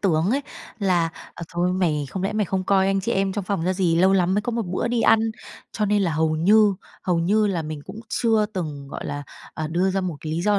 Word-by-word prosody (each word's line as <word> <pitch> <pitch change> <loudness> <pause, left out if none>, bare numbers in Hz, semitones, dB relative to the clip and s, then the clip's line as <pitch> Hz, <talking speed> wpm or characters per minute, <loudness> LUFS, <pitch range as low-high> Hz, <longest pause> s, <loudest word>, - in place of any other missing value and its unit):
tướng 170 0 +2
ấy, 280 +3 +1 0.4
là 180 -5 +2 0.3
"Ờ, - - -8
thôi, 175 +1 +1
mày 160 -6 0
không 190 - -4
lẽ 195 - -1
mày 210 -1 +1
không 190 +1 -2
coi 190 -1 +3
anh 195 0 +1
chị - - -2
em 195 0 +1
trong 205 -2 -3
phòng 185 -4 -2
ra 185 - +2
gì? 180 -3 +1
Lâu 190 +3 +4
lắm 185 0 +2
mới 210 - +1
có 240 - -3
một 230 0 -1
bữa 185 +6 -1
đi 240 -1 0
ăn." 225 - +5 0.5
Cho 210 - -1
nên 205 0 +2
là 170 -4 0
hầu 155 0 +1
như 205 +4 +5 0.3
hầu 175 -2 +1
như 210 +5 +2
là 175 -5 -1
mình 155 -1 -6
cũng 210 +3 -9
chưa 220 -3 +2
từng, 155 -9 -5
gọi - - -7
là, 145 0 -4 0.3
ờ, 155 - -3
đưa 180 +4 +1
ra 195 - 0
một 180 -5 -3
cái 155 -1 -4
lý 170 +2 -1
do 205 0 +3
190 Hz, 265 wpm, -23 LUFS, 165-205 Hz, 0.5 s, ăn